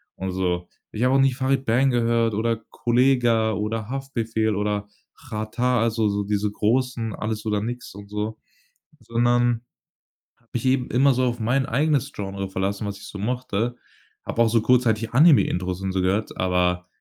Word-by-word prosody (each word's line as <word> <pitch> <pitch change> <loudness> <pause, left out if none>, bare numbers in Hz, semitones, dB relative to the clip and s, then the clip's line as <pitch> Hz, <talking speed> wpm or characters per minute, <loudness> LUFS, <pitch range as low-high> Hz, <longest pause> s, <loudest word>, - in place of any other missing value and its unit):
und 95 0 -4
so. 90 -1 -1 0.2
Ich 110 - -2
habe 130 +1 +3
auch - - +4
nicht 135 -2 +2
„Farid 135 0 +1
Bang“ 125 +3 +3
gehört 115 -2 +2
oder 115 +2 0
„Kollegah“ 120 -2 +2
oder 105 +1 -3
„Haftbefehl“ 115 -5 -2
oder 105 0 -2 0.3
„Xatar“, 120 +1 -1
also 115 -1 +1
so 100 0 -1
diese 105 0 0
großen, 115 +1 0
alles 110 0 -4
oder 105 -1 0
nix 120 -1 -6
und 100 0 -11
so. 105 +1 -3 0.6
Sondern 120 0 +1 0.8
habe 115 - -34
mich 120 - -2
eben 130 -1 +2
immer 135 +3 +4
so 130 0 +1
auf 120 -1 -1
mein 130 +5 +1
eigenes 140 +1 +1
Genre 95 -1 -4
verlassen, 100 +2 -2
was 100 0 -4
ich - - -11
so 105 - -8
mochte. 120 +1 -2 0.5
Habe - - -3
auch 115 - +3
so 115 0 +2
kurzzeitig 115 -2 +2
„Anime 140 - +7
Intros“ 90 +1 -3
und 95 -1 -2
so 95 - 0
gehört, 95 +4 0
aber 90 -1 +1
115 Hz, 175 wpm, -23 LUFS, 105-125 Hz, 0.8 s, Anime